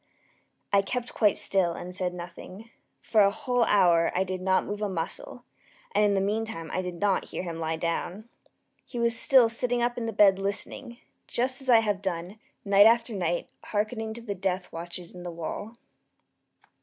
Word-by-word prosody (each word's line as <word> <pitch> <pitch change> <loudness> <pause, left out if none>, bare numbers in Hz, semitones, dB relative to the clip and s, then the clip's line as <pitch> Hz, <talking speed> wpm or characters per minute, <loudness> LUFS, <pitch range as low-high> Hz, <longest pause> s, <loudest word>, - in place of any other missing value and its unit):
I 200 - +6
kept 245 +4 -4
quite 210 -3 +3
still 185 -3 +1
and 180 +2 -7
said 180 -1 -1
nothing. 180 +5 -10 0.3
For 220 - +3
a 200 - +6
whole 245 +3 0
hour 170 -4 +4
I 185 - +2
did 185 -1 -5
not 190 0 +2
move 205 +1 -5
a 210 - -1
muscle, 190 - -5 0.5
and - - +3
in 205 -1 +3
the - - +2
meantime 205 -5 -3
I 185 - 0
did 180 -1 -5
not 200 -2 +1
hear - - -5
him 170 -2 -5
lie 160 0 -1
down. 170 +6 -3 0.6
He 245 - -9
was 235 -1 +3
still 255 -1 +6
sitting 240 +1 0
up 240 0 -1
in 230 - -3
the - - -1
bed 200 -2 +5
listening; 200 +4 -4 0.3
just 255 +3 0
as 265 - -6
I 230 -2 +7
have 205 -3 -1
done, 185 +2 -4 0.3
night 200 +1 +7
after 230 0 +2
night, 175 -3 -2
hearkening 220 +1 -2
to 235 - -8
the 210 -3 -3
death 185 -1 -3
watches 170 +1 -7
in 180 - -10
the 175 - -6
wall. 175 +7 -6
200 Hz, 190 wpm, -27 LUFS, 180-225 Hz, 0.6 s, I